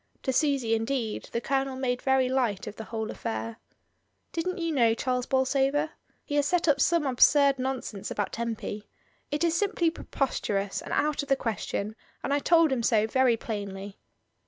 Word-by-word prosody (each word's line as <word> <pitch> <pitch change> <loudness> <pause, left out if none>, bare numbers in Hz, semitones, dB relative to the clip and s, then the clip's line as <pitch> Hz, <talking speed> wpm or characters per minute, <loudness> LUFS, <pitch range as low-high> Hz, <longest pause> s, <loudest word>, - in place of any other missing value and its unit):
To 260 - 0
Susy, 275 -5 +2
indeed, 225 0 -2
the 235 - -1
Colonel 270 +1 -1
made 255 -1 -1
very 265 -1 +3
light 245 -7 0
of 210 - -7
the 220 - -7
whole 220 -1 -4
affair. 230 0 -4 0.7
"Didn't 365 +3 -2
you 335 -2 -1
know 235 -6 +3
Charles 250 +1 -1
Bolsover? 275 +3 +1 0.3
He 290 - -6
has 290 -1 +3
set 355 0 +1
up 285 -2 +4
some 335 0 +3
absurd 275 +1 +5
nonsense 255 -6 -3
about 205 - -2
Tempy. 225 -2 -4 0.4
It 295 +3 -1
is 335 -1 +2
simply 345 -3 +1
preposterous, 205 -10 -2
and - - -9
out 300 0 +1
of 285 - -9
the 275 - +5
question, 215 -3 -3 0.3
and 280 - 0
I 285 - +3
told 330 0 +4
him 260 -3 +1
so 220 -2 +3
very 245 +1 +3
plainly." 200 -3 -6
260 Hz, 175 wpm, -28 LUFS, 225-285 Hz, 0.7 s, absurd